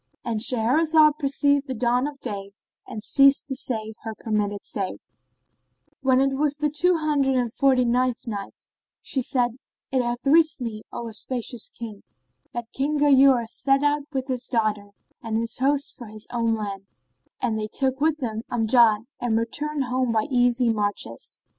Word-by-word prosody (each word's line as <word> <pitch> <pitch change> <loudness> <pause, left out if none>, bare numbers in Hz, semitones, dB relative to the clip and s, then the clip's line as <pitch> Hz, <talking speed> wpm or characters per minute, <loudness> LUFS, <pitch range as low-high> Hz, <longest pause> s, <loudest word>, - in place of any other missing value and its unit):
—And 230 -2 -1
Shahrazad 300 +7 +3
perceived 285 0 +1
the 260 - -3
dawn 245 +3 +1
of 290 -2 -8
day 200 -4 -6 0.3
and 215 - -7
ceased 275 +2 +5
to 270 - -4
say 220 -4 -3
her 225 -1 -6
permitted 210 -2 -2
say, 195 -3 -3 1.0
When 260 -1 +3
it 270 0 +2
was 290 +1 0
the 300 0 -1
Two 345 +4 +3
Hundred 290 -4 +1
and 245 -3 0
Forty 260 -2 +3
ninth 250 +1 0
Night, 205 -4 -6 0.4
She 270 - -1
said, 245 -1 +1 0.4
It 260 -1 +2
hath 240 +1 -3
reached 315 +2 +4
me, 225 -4 -5
O 235 - -5
auspicious 235 +1 -1
King, 220 -4 -9 0.5
that 240 -1 -6
King 290 +3 -1
Ghayur 270 -4 +5
set 275 +4 +1
out 290 0 +1
with 265 -3 -2
his 255 -2 -2
daughter 215 -4 -1 0.3
and 225 -1 -2
his 230 +1 -3
host 280 +2 +1
for 240 - -10
his 215 0 -10
own 230 -2 +1
land, 200 -2 -6 0.5
and 235 -3 -1
they 215 - -3
took 265 +4 -2
with 310 0 +2
them 225 -6 -4
Amjad 225 -2 +3
and 230 -2 0
returned 285 +6 -1
home 255 -1 -1
by 220 -1 +1
easy 245 -1 +3
marches. 205 - -3
245 Hz, 165 wpm, -24 LUFS, 225-275 Hz, 1.0 s, ceased